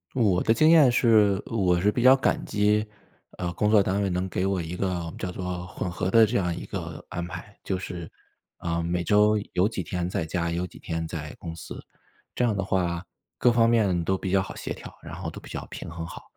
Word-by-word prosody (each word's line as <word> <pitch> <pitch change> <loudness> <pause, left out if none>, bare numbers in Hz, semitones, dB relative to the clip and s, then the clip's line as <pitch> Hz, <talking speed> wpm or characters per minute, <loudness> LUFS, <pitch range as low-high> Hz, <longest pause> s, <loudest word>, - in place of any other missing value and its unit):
我 105 -8 +3
的 115 - +3
经 155 +7 +5
验 155 -6 +7
是 110 -5 +4
我 90 -6 +1
是 100 +4 +3
比 120 - -1
较 130 +2 +8
感 135 - 0
激， 105 +1 +2 0.5
呃， 85 -1 -3
工 105 - +1
作 105 -1 +6
单 95 +2 0
位 100 - 0
能 90 +1 -1
给 90 - -2
我 95 -1 0
一 85 +1 -4
个 90 -3 -2
叫 90 - -3
做 90 -1 -5
混 90 - -4
合 90 +1 -2
的 115 +3 +6
这 110 +3 -3
样 90 -3 0
一 - - -7
个 - - -6
安 85 - -4
排， 95 +4 -9
就 95 - -1
是， 90 -2 -7 0.5
啊， 85 0 -2
每 85 +1 -1
周 105 +2 +4 0.2
有 95 +4 +3
几 105 -5 -4
天 90 +1 -3
在 85 - -2
家， 85 +1 -1
有 85 +2 -1
几 - - -12
天 80 0 -3
在 75 -2 -6
公 85 -2 -7
司， 80 - -8 0.5
这 - - 0
样 110 -4 +1
的 95 - -1
话 90 -2 -1 0.3
各 125 - +4
方 115 -1 +4
面 100 -7 +2
都 95 +3 +1
比 95 - -4
较 95 0 +4
好 95 - -7
协 - - -4
调， - - -10
然 - - -8
后 - - -5
都 - - -9
比 - - -14
较 - - -5
平 - - -7
衡 85 0 -6
好。 - - -9
95 Hz, 255 characters per minute, -26 LUFS, 85-105 Hz, 0.5 s, 较